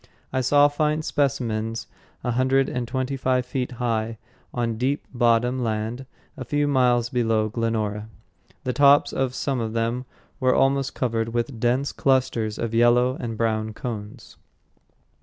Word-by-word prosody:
I 130 - +1
saw 145 +3 +5
fine 150 +1 0
specimens 115 -7 -1 0.4
a 120 - 0
hundred 130 +2 +2
and 125 -1 -3
twenty 130 +2 -2
five 130 -1 0
feet 125 0 -3
high 115 -2 -2 0.3
on 115 -2 -2
deep 135 +4 0
bottom 120 +1 +2
land 115 +3 -3 0.3
a 140 - -6
few 145 +2 0
miles 125 -4 +2
below 115 -3 +1
Glenora. 110 -2 -2 0.5
The 125 - -1
tops 145 +1 +5
of 130 -1 -1
some 135 -2 -1
of 110 -1 -3
them 115 +2 -1 0.3
were 130 -1 +3
almost 135 0 +2
covered 115 -2 -1
with 120 0 -2
dense 125 +4 +1
clusters 125 -5 +1
of 115 -1 -3
yellow 120 +2 +4
and 115 -2 -4
brown 110 -1 -1
cones. 110 -4 -7
125 Hz, 145 wpm, -24 LUFS, 115-130 Hz, 0.5 s, saw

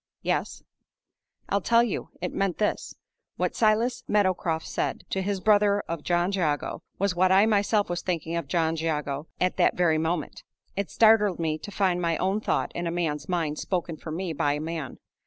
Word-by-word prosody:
"Yes." - - -2 0.8
"I'll 200 - +1
tell 235 +4 +4
you. 235 - -3
It 180 - -3
meant 195 -3 0
this: 210 - -1 0.4
What - - -1
Silas 225 +2 +2
Meadowcroft 185 -5 +1
said - - -2
to 190 - 0
his 195 0 -1
brother 205 0 +4
of 165 -2 -5
John 175 +3 +1
Jago 160 -7 -1 0.2
was 200 -1 +1
what 185 +1 +3
I 195 +2 +6
myself 205 -1 +2
was 175 0 -3
thinking 165 -2 -2
of 170 - -3
John 165 -2 +1
Jago 150 -2 -2
at 180 0 +1
that - - +3
very 165 -3 +3
moment. 160 -1 -2 0.3
It 200 0 -2
startled 215 -4 +4
me 155 -2 -1
to 205 - -8
find 185 -3 +1
my 165 -2 +1
own 195 +3 0
thought - - 0
in 175 0 -3
a - - -1
man's 165 -1 -2
mind 165 -4 -1
spoken 175 -3 -2
for 155 - -9
me 170 +2 -3
by 145 -1 +1
a 150 - -3
man. 155 -4 -5
180 Hz, 190 wpm, -26 LUFS, 160-200 Hz, 0.8 s, I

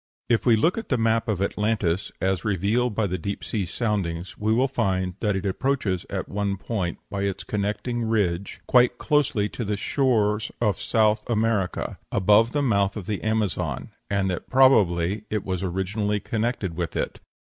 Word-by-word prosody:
If 120 +1 +2
we 120 - +7
look 165 - +2
at 225 - -9
the 130 - +2
map 115 0 +1
of 100 -3 0
Atlantis, 100 -3 0
as 95 -2 0
revealed 105 +4 +1
by 110 - +1
the 95 -1 -2
deep 100 +4 -4
sea 100 -5 -2
soundings, 95 -5 -2
we 110 +1 -1
will 125 +4 +3
find 95 -8 0
that 105 -3 0
it 95 - -3
approaches 100 -3 -1
at - - -3
one 100 -1 -2
point, 95 -4 -3
by 100 -1 -2
its 100 -1 -2
connecting 110 +3 -2
ridge, 100 -5 -1
quite 125 -1 +4
closely 145 -9 +1
to 120 - -5
the 105 -1 -2
shore 110 -4 +2 0.2
of 105 -6 +1
South 110 -1 +2
America, 110 -4 0
above 105 +4 +4
the 145 -1 0
mouth 100 -5 +1
of 100 - -6
the 105 0 -3
Amazon, 110 -3 -1 0.2
and 100 -1 +1
that 90 - -5
probably 105 -7 +4
it 105 -2 -2
was 95 -2 -2
originally 100 +3 -1
connected 110 -3 -2
with 85 -2 -3
it. - - -2
105 Hz, 175 wpm, -25 LUFS, 95-115 Hz, 0.2 s, we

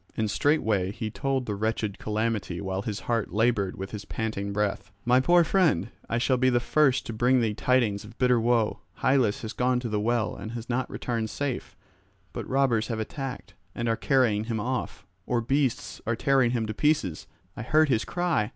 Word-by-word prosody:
And 110 -2 0
straightway 110 -11 +1
he 110 0 -5
told 135 +2 -1
the 105 - -2
wretched 105 0 -2
calamity 105 -5 -2
while 95 -1 -3
his 105 +1 -4
heart 115 -3 -1
laboured 105 -3 +1
with 95 +1 -6
his 105 -2 -6
panting 100 -2 -3
breath. 105 0 -1 0.2
"My 125 +1 +5
poor 175 +6 +5
friend, 175 -9 +2 0.2
I 115 - 0
shall 130 +2 +2
be 130 +1 +3
the 120 -1 +3
first 135 +1 +2
to 115 - -5
bring 125 +4 +3
thee 110 -3 +1
tidings 115 -4 +1
of 105 +2 -13
bitter 125 -2 +3
woe. 115 -1 +1 0.2
Hylas 130 -6 +2
has 110 - -4
gone 125 0 +1
to 120 - -3
the 105 -1 0
well 115 +1 0
and 110 - -7
has 115 0 -6
not 125 +1 -1
returned 115 -3 -3
safe, 140 -1 -4 0.6
but - - -6
robbers 130 -5 +2
have 115 -2 -3
attacked 135 +3 -5 0.2
and 120 - -2
are 115 - +2
carrying 115 -5 +2
him 115 -1 -2
off, 120 -5 -3 0.2
or 120 - +1
beasts 135 +2 -1
are 115 - +1
tearing 135 0 +3
him 120 -2 0
to 110 - -4
pieces; 145 - 0 0.3
I - - -6
heard 155 +5 +3
his 115 -4 +2
cry." 175 -12 0
115 Hz, 195 wpm, -27 LUFS, 110-130 Hz, 0.6 s, My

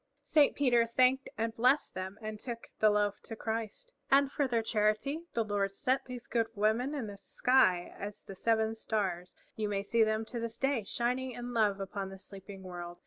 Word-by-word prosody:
Saint 290 0 +4
Peter 240 -4 +3
thanked 255 +3 +3
and 225 0 -1
blessed 255 +5 +3
them 190 +2 -5
and 215 -1 -5
took 235 -1 -7
the 215 - +6
loaf 205 -1 +1
to 225 - -8
Christ. 225 - -4 0.2
And 275 0 +5
for 285 -2 +1
their 235 -3 +1
charity 220 +10 0
the 230 - +1
Lord 205 -2 0
set 260 +4 0
these 250 -2 -7
good 230 -2 0
women 220 +7 +1
in 270 -6 -3
the 205 -1 -8
sky 190 -6 +2
as 205 0 -6
the 195 - -9
Seven 220 +2 +1
Stars, 190 -5 -2 0.2
you 215 -1 -2
may 200 -1 -1
see 230 +3 +2
them 220 0 +2
to 235 +2 -5
this 230 -1 -4
day 270 -4 +1
shining 250 +4 -1
in 245 +1 -6
love 210 -4 +2
upon 195 0 -4
the 195 - -9
sleeping 195 0 -10
world. 175 -1 -7
225 Hz, 195 wpm, -32 LUFS, 205-250 Hz, 0.2 s, the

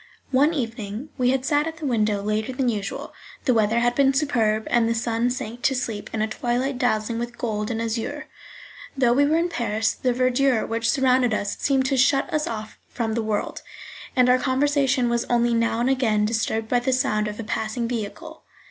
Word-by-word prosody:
One 280 +4 +4
evening 230 -2 -4
we 250 0 +3
had 260 0 0
sat 295 +1 +2
at 325 0 -6
the 320 - -6
window 215 -5 +1
later 215 +3 -1
than 255 -1 0
usual; 205 -3 -4 0.3
the 255 - +3
weather 225 +1 +2
had 240 0 +2
been 270 +1 +3
superb, 225 -7 +1
and 235 -1 +3
the 230 - +1
sun 230 +1 0
sank 245 -1 -5
to 265 - +2
sleep 225 -5 -4
in 220 -1 -1
a - - 0
twilight 245 +4 -2
dazzling 230 -2 0
with 240 0 -5
gold 210 -3 -2
and 225 -2 -2
azure. 230 +7 -3 0.7
Though 245 -3 +4
we 285 +3 +3
were 315 +2 +2
in 340 +1 +1
Paris, 225 -7 0
the 255 - -1
verdure 255 0 +2
which 230 0 -1
surrounded 255 -4 +3
us 200 -1 -2
seemed 270 -2 +1
to 270 0 +1
shut 270 +2 +2
us 305 0 0
off 215 -1 -6
from 225 -2 -2
the 230 - 0
world, 215 -1 -2 0.5
and 250 -2 +4
our 250 0 +4
conversation 270 -1 +1
was 235 0 0
only 240 0 +2
now 230 0 +1
and 245 - +2
again 220 -6 +2
disturbed 225 0 -1
by 245 +2 +2
the 260 +2 0
sound 215 -5 +1
of 210 +1 -6
a - - -3
passing 220 +2 -2
vehicle. 245 +8 -6
240 Hz, 205 wpm, -23 LUFS, 220-265 Hz, 0.7 s, One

